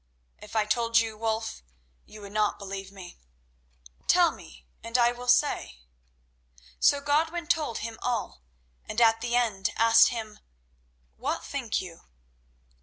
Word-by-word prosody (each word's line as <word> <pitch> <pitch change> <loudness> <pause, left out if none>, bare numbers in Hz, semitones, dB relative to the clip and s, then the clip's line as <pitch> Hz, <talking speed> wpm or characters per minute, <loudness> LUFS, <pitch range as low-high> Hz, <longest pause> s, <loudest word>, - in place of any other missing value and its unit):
"If 210 +1 -12
I 215 -1 +2
told 230 +1 +1
you, 225 -1 +2
Wulf, 220 - -3 0.5
you 215 - -12
would 200 -1 -10
not 210 0 +1
believe." 195 -1 -7 1.2
"Tell - - +5
me, 65 0 -14 0.2
and 230 +2 -1
I 240 -1 +4
will 245 +1 -9
say." 245 - +2 1.0
So 285 - +4
Godwin 320 +4 0
told 315 -8 0
him 225 -1 -7
all, 240 - -3 0.4
and 220 - -3
at 225 -1 +4
the 240 0 -1
end 215 -6 +1
asked 230 0 +6
him, 220 -3 -5 0.8
"What - - -3
think - - -2
you?" - - -11
230 Hz, 135 wpm, -27 LUFS, 210-245 Hz, 1.2 s, asked